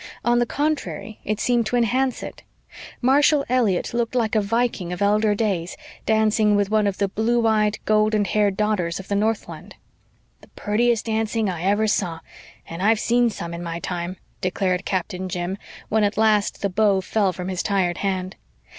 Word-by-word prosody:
On 240 0 +3
the 240 - +1
contrary, 290 -6 -3
it 215 0 -2
seemed 240 -3 +1
to 245 - -1
enhance 250 +2 +1
it. - - -8 0.6
Marshall 285 +2 +4
Elliott 235 -8 +1
looked 235 +1 -1
like 225 -3 +1
a 215 - +3
Viking 215 -4 -1
of 180 - -4
elder 210 +1 +2
days, 190 -5 -2 0.3
dancing 215 -1 +3
with 205 0 +1
one 215 -1 +3
of 195 - -2
the 200 - +1
blue 230 +4 0
eyed, 215 -1 +2
golden 215 -1 +2
haired 205 -1 +1
daughters 200 -6 0
of 190 - -10
the 200 - 0
Northland. 220 +1 -2 0.7
"The - - -17
purtiest 230 +2 +1
dancing 220 -1 0
I 170 -2 -6
ever 205 +3 +2
saw, 180 -6 -1 0.5
and 165 +2 -7
I've 215 +2 +3
seen 240 +1 +2
some 170 -5 -6
in 170 - -6
my 170 -1 -4
time," 175 +1 -4 0.2
declared 185 0 -1
Captain 185 0 -3
Jim, 175 +1 -3 0.3
when 220 0 +2
at 205 0 0
last 215 -2 +2
the 200 - +1
bow 200 0 +2
fell 200 0 +1
from 180 +1 -6
his 185 -1 -2
tired 190 -4 0
hand. 190 -1 -2
210 Hz, 180 wpm, -22 LUFS, 190-225 Hz, 0.7 s, Marshall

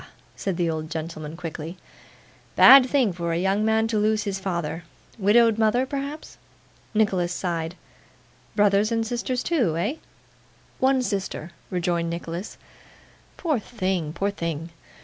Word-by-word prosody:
said 190 -4 -3
the 175 -2 +1
old 160 -1 -3
gentleman 160 -1 -6
quickly. 165 0 -6 0.8
'Bad 270 -1 +9
thing 250 -9 +2
for 170 -1 -3
a - - 0
young 195 +4 +1
man 220 0 +2
to 220 -2 0
lose 215 +1 +2
his 195 -2 -3
father. 170 -3 -3 0.4
Widowed 225 +2 +4
mother, 225 +4 +3
perhaps?' 280 +3 -6 0.6
Nicholas 190 -5 +2
sighed. 170 -2 -3 0.8
'Brothers 205 +1 +3
and 225 -1 0
sisters 245 +2 -2
too? 240 - +1
Eh?' 210 - -1 0.8
'One 260 0 +3
sister,' 195 -6 -3 0.2
rejoined 175 -2 -1
Nicholas. 170 +3 -5 0.8
'Poor 310 -8 0
thing, 185 -8 -2
poor 200 +5 -1
thing! 170 -3 -4
195 Hz, 130 wpm, -24 LUFS, 170-225 Hz, 0.8 s, Bad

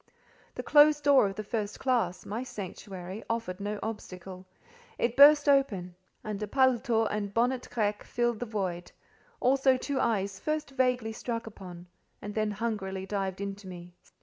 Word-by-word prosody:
The - - -4
closed 295 0 +5
door 280 -7 +5
of 195 - -5
the 215 - -4
first 210 -1 -3
classe—my 225 -3 -1
sanctuary—offered 195 -1 -6
no 205 +1 -3
obstacle; 185 -4 -7 0.5
it 235 0 0
burst 295 +1 +8
open, 210 -11 +2 0.3
and 215 -1 -5
a 210 - -2
paletôt 240 -2 +2
and 205 -1 -2
a - - -17
bonnet 245 +4 0
grec 210 -3 0
filled 240 -2 -1
the 245 - -4
void; 185 -5 -3 0.5
also 265 0 +3
two 275 +1 -2
eyes 200 -3 0
first 305 -2 -2
vaguely 250 -4 0
struck 230 0 -4
upon, 180 -5 -10 0.3
and 205 - -7
then 215 0 0
hungrily 205 -3 -3
dived 195 -1 -3
into 200 0 -6
me. 175 -1 -10
215 Hz, 150 wpm, -29 LUFS, 195-250 Hz, 0.5 s, burst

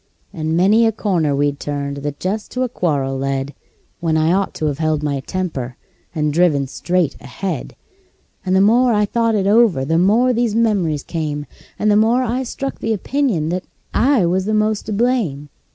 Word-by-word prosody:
And 160 -2 -1
many 215 +6 +4
a - - +2
corner 175 -9 0
we'd 145 0 0
turned 140 -1 -4
that 145 0 -5
just 205 +4 -3
to 255 - 0
a 255 - -1
quarrel 140 - -1
led, 135 +1 -2 0.5
When 165 -2 0
I 160 +2 +2
ought 195 +1 -1
to 155 - -3
've 140 - -12
held 155 -2 0
my 140 -2 -1
temper, 135 -6 -4 0.4
and 150 -1 0
driven 155 -4 +3
straight 165 +3 -1
ahead; 180 +8 -5 0.7
And 185 -1 0
the 190 - +5
more 240 +4 +4
I 210 -1 +3
thought 230 +1 0
it 195 -2 0
over 205 - +3
the 165 +3 +1
more 230 +8 +3
these 235 -2 0
memories 195 -10 +1
came, 150 -3 -3 0.3
And 215 - +2
the - - +4
more 230 +4 +3
I 250 +2 -1
struck 270 +2 -5
the 225 - -1
opinion 215 - -1
that 180 +2 -3 0.3
I 255 -7 +3
was 185 +2 0
the 215 +1 0
most 215 -1 0
to - - -3
blame. 205 - 0
185 Hz, 190 wpm, -19 LUFS, 150-220 Hz, 0.7 s, the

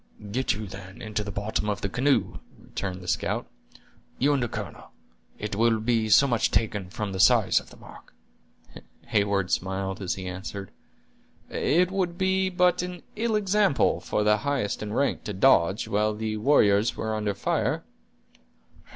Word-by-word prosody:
"Get 130 +4 0
you, 105 +2 -5
then, 95 0 -10
into 105 -1 -3
the 100 - -6
bottom 105 +1 -2
of 105 - -2
the - - -1
canoe," 135 +7 +1 0.2
returned 95 -2 -5
the 90 - -11
scout; - - -1 0.7
"you 145 +3 +3
and 140 - +1
the 120 - 0
colonel; - - -7 0.5
it 105 -1 -4
will 115 +1 +3
be 110 -1 +1
so 135 - +7
much 120 -4 +1
taken 105 -4 -1
from 105 +2 -4
the 95 - -5
size - - +5
of - - -15
the - - -15
mark." - - -14 1.0
Heyward 100 -3 +1
smiled, 95 +1 -2
as 95 - -1
he 95 - -7
answered: 95 +1 -6 0.8
"It 180 +3 +2
would 180 -3 -1
be 190 0 +1
but 180 -1 +2
an 180 -1 -6
ill 220 0 0
example 205 -5 +2
for 105 - -1
the 105 0 +4
highest 135 -4 -2
in 105 -1 -4
rank 140 +5 0
to 105 - -3
dodge, 95 -2 +3
while 105 +1 +1
the 110 0 -3
warriors 105 -3 +3
were 110 0 -2
under 105 -2 -1
fire." - - -1
110 Hz, 170 wpm, -26 LUFS, 100-140 Hz, 1.0 s, so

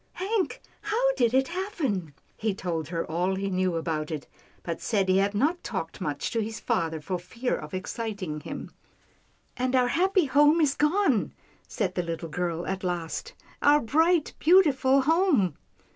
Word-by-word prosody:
" - - -41
Hank, 395 +1 -1 0.2
how - - +1
did 235 - +2
it 265 +1 +2
happen? 300 - -3
" - - -38
He 215 -3 -1
told 165 -5 -3
her 165 0 -2
all 180 +4 0
he 195 +1 -2
knew 185 -1 0
about 160 -2 -2
it, 155 -3 -4 0.4
but 170 -1 -4
said 200 -4 +1
he 185 +1 +4
had 200 +1 +1
not 310 - +1
talked 190 -7 -5
much 145 -1 -2
to 230 - 0
his 220 +1 -4
father, 165 -9 -1
for 180 +4 -3
fear 230 +8 -3
of 150 0 -8
ex 185 - -4
citing 200 -9 -4
him. - - -7 0.4
" - - -39
And 255 0 0
our 250 -1 +3
happy 375 +3 +2
home 295 +4 +5
is 295 -4 +3
gone," 300 - +1 0.3
said 195 -6 -2
the 180 - 0
little 165 -1 -5
girl 170 +1 -2
at 190 0 -3
last, 180 - -3 0.2
" - - -27
our 290 +1 +6
bright, 320 +6 +2
beautiful 280 -6 +5
home." 295 - +2
215 Hz, 185 wpm, -27 LUFS, -, 0.4 s, our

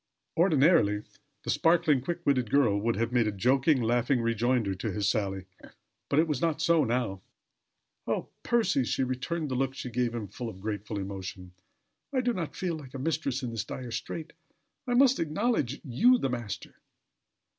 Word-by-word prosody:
Ordinarily 155 - +4 0.4
the - - -1
sparkling, 165 -5 +3
quick 170 +5 -4
witted 130 -5 +2
girl 115 -7 +3
would 115 +2 0
have 115 +3 -1
made 120 -3 +3
a - - +1
joking, 130 - +2
laughing 120 +3 +2
rejoinder 115 -2 +1
to 100 +3 -3
his 100 0 -1
sally, 95 -3 -1 0.6
but 140 - +1
it 160 +2 +4
was 150 -4 -1
not 165 -2 +1
so 160 -1 +4
now. 115 -6 -1 0.9
"Oh! - - -1
Percy," 230 - +2
she 130 - 0
returned, 130 +5 -2
the - - 0
look 135 +1 -1
she 125 - -6
gave 120 0 0
him 110 -3 -4
full 115 +4 -6
of 95 - -10
grateful 105 0 -4
emotion. 95 -2 -6 0.6
"I 260 -2 +1
do 245 -1 +1
not 170 -7 -4
feel 180 -3 -2
like 135 -3 -11
a - - -2
mistress 140 -2 -1
in 120 - -3
this 115 - -3
dire 125 -2 -7
strait. 155 +7 -5 0.5
I 245 - +1
must 265 +1 +5
acknowledge 160 - 0
you 220 - +4
the 135 - -1
master. 120 -5 -5
125 Hz, 175 wpm, -29 LUFS, 110-160 Hz, 0.9 s, must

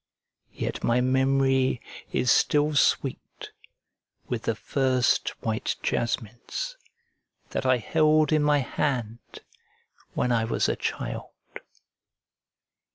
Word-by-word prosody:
Yet - - -4
my 120 +1 +3
memory 130 0 +2 0.3
is 125 - +2
still 150 +1 +3
sweet 140 -2 0 0.8
with - - -3
the - - 0
first 130 -2 +1
white 110 -1 -1
jasmines 120 - -3 0.8
that 130 - -2
I 130 -1 +4
held 155 +5 +3
in 155 - +3
my 145 -1 +3
hand 120 -5 -3 0.7
when 125 - +1
I 115 -1 +2
was 115 - 0
a - - 0
child. - - -4
130 Hz, 100 wpm, -26 LUFS, 120-145 Hz, 0.8 s, I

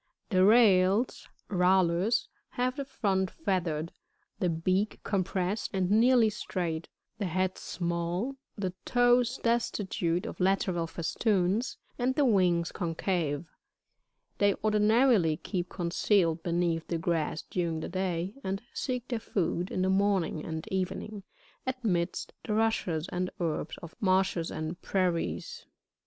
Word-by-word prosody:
58. 185 - +3
The 185 - +6
Rails, 205 0 +4
— - - -37
Rallus, 185 +3 +3
— - - -46
have 250 +1 +1
the 280 - -3
front 190 -7 0
feathered, 170 - -2 0.5
the 180 - +1
bealr 185 +5 0
compressed 190 +1 -1
and 185 0 +1
nearly 230 0 +5
straight, 170 -5 -3 0.3
the 200 - -1
head 185 +2 0
small, 175 +8 -2 0.2
the 190 -3 -2
toes 245 0 +3
destitute 195 -7 0
of - - -7
lateral 185 -2 +1
festoons, 190 +5 0 0.2
and 255 +2 +1
the 290 - +3
wings 180 -7 +3
concave. 165 -3 -1 0.9
They 200 -1 +4
ordinarily 215 - +4
keep 180 -1 -3
concealed 170 -1 +1
beneath 170 -1 0
the 170 - -1
grass 165 -2 -1
during 165 -3 -2
the - - -4
day, 185 0 -2
and 190 +1 -2
seek 250 -2 -3
their 240 -3 -2
food, 180 -4 -1
in 185 - -1
the 190 - +2
morning 190 -5 +1
and 160 0 -5
evening, 190 +2 -3 0.5
amidst 205 -9 -1
the 210 - -1
rushes 195 -8 0
and 180 +1 -2
herbs 165 -2 -2
of 170 - -8
marshes 185 -3 +2
and 160 +3 -5
prairies. 185 - -1
59. - - -25
185 Hz, 135 wpm, -29 LUFS, 170-215 Hz, 0.9 s, The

